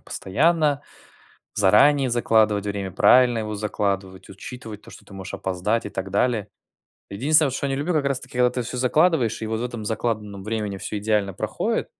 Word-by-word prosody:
постоянно, 150 - 0 0.7
заранее 125 +7 +4
закладывать 110 -3 +2
время, 100 -2 -4
правильно 125 +3 +5
его 110 -1 -4
закладывать, 100 -2 -3
учитывать 110 +1 -9
то, - - -14
что - - -14
ты - - -17
можешь 95 +1 -7
опоздать 95 +5 -1
и 105 - -6
так 95 0 -5
далее. 110 0 +1 0.6
Единственное 150 +10 +3
вот, - - -5
что 140 - -2
я - - -3
не 135 - -1
люблю, 155 +6 -1
как 150 -3 +1
раз 135 -2 +1
таки, 125 0 -7
когда 125 0 +4
ты 125 - -3
всё 125 +2 -5
закладываешь 130 -1 +2
и 110 - -4
вот 110 0 -2
в 120 - -2
этом 120 -3 -5
закладанном 105 -2 -3
времени 105 -2 -3
всё 105 - -4
идеально 105 -1 0
проходит, - - -2
110 Hz, 190 wpm, -23 LUFS, 100-125 Hz, 0.7 s, правильно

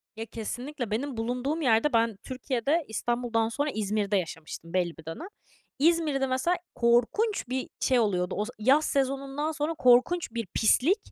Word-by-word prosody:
Ya, 225 +1 -5
kesinlikle, 245 +3 -5
benim 255 +3 -2
bulunduğum 250 +7 -2
yerde 240 +1 +3
ben 230 -2 +2
Türkiye'de 265 +4 -1
İstanbul'dan 230 0 -1
sonra 290 +5 -1
İzmir'de 210 -1 0
yaşamıştım 165 -1 -6
belli 175 -2 0
bir 160 - -13
dönem. 165 - -6 0.5
İzmir'de 300 -3 +2
mesela 260 +8 +1 0.2
korkunç 245 - +2
bir 260 0 -3
şey 255 -2 +3
oluyordu, 180 -5 0
o 210 - 0
z 240 - -8
yaz 270 +8 +4
sezonundan 275 +2 -1
sonra 310 +1 -2
korkunç 255 +4 +3
bir 230 -3 -4
pislik. 270 - +3
245 Hz, 150 wpm, -28 LUFS, 220-290 Hz, 0.5 s, yaz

